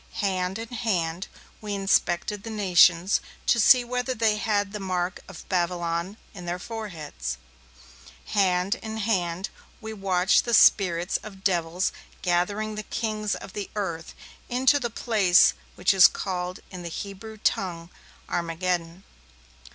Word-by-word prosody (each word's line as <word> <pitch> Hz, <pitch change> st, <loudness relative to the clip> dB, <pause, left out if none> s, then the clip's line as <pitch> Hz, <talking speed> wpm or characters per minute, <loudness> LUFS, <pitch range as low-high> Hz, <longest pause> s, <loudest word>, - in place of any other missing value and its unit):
Hand 185 Hz, -2 st, -1 dB
in 225 Hz, 0 st, -7 dB
hand 185 Hz, -7 st, -2 dB, 0.3 s
we 210 Hz, -1 st, -4 dB
inspected 195 Hz, 0 st, +1 dB
the 225 Hz, -, -8 dB
nations, 185 Hz, -3 st, +4 dB, 0.2 s
to 235 Hz, -, +3 dB
see 250 Hz, +3 st, +7 dB
whether 250 Hz, +1 st, -2 dB
they 220 Hz, -2 st, +2 dB
had 205 Hz, -1 st, 0 dB
the 210 Hz, -, -4 dB
mark 185 Hz, -2 st, -2 dB
of 190 Hz, -4 st, -11 dB
Babylon 175 Hz, +1 st, -1 dB, 0.2 s
in 180 Hz, -3 st, -9 dB
their 175 Hz, +1 st, -2 dB
foreheads. 180 Hz, -, -6 dB, 0.9 s
Hand 185 Hz, -1 st, +2 dB
in 220 Hz, 0 st, -6 dB
hand 190 Hz, -4 st, -1 dB, 0.3 s
we 220 Hz, -1 st, -7 dB
watched 190 Hz, -3 st, +2 dB
the 235 Hz, -1 st, +2 dB
spirits 180 Hz, -4 st, +4 dB
of 195 Hz, -2 st, -11 dB
devils 175 Hz, -1 st, 0 dB, 0.3 s
gathering 200 Hz, +5 st, 0 dB
the 215 Hz, -, -4 dB
kings 215 Hz, -2 st, -2 dB
of -, -, -10 dB
the 205 Hz, -2 st, -5 dB
earth 170 Hz, -6 st, -4 dB, 0.3 s
into 260 Hz, +4 st, +3 dB
the 240 Hz, -3 st, -2 dB
place 210 Hz, -6 st, +4 dB, 0.2 s
which -, -, +2 dB
is 190 Hz, -2 st, +9 dB
called 180 Hz, -1 st, -4 dB
in 185 Hz, -, -7 dB
the 170 Hz, -, -6 dB
Hebrew 200 Hz, +5 st, -7 dB
tongue 180 Hz, -6 st, -2 dB, 0.4 s
Armageddon. 170 Hz, +1 st, -2 dB
195 Hz, 135 wpm, -26 LUFS, 175-215 Hz, 0.9 s, is